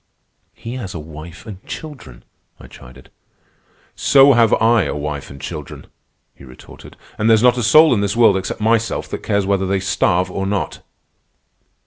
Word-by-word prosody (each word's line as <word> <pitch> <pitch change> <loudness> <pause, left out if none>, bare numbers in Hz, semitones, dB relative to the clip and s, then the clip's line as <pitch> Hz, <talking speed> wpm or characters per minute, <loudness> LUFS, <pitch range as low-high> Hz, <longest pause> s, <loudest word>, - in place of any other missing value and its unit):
"He 120 +3 -8
has 95 -8 -7
a - - -5
wife 80 +4 -11
and 100 -3 -10
children," 135 - -10 0.4
I - - -14
chided. 65 +1 -16 0.8
"So 140 0 +5
have 115 -2 +3
I 115 -2 +2
a - - -4
wife 75 -1 -5
and 70 - -12
children," - - -8 0.5
he - - -18
retorted. 65 -1 -15 0.2
"And 110 +2 +1
there's 110 0 +4
not 125 -1 +5
a 125 - -2
soul 155 +6 +5
in 105 - 0
this 100 +1 -2
world 115 -4 +4
except 95 +2 -4
myself 115 +1 0
that - - -6
cares 100 -2 -1
whether 95 -1 0
they 95 0 0
starve 90 -1 0
or 95 +1 -3
not." 100 0 -3
100 Hz, 170 wpm, -18 LUFS, 90-115 Hz, 0.8 s, So